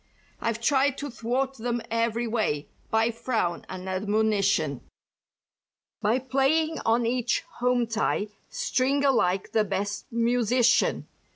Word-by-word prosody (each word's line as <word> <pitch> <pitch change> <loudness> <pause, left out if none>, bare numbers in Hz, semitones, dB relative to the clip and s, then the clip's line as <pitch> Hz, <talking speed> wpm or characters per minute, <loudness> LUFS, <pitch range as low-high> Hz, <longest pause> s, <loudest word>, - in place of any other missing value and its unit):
"I've 230 0 -1
tried 270 +2 +2
to 285 -1 -5
thwart 260 +4 -2
them 240 +1 -1
every 230 +1 0
way—by 220 +1 -1
frown 225 -7 -2
and 185 0 -7
admonition; 195 - +1 1.2
"By 220 +3 +2
playing 275 +5 +1
on 230 +1 +2
each 240 0 0 0.2
'home 245 0 +2
tie' 220 -2 -1 0.2
string 275 +2 0
alike 195 -9 +2
the 220 - +3
best 200 +1 -3
musician. 240 +1 +2
230 Hz, 110 wpm, -26 LUFS, 210-250 Hz, 1.2 s, the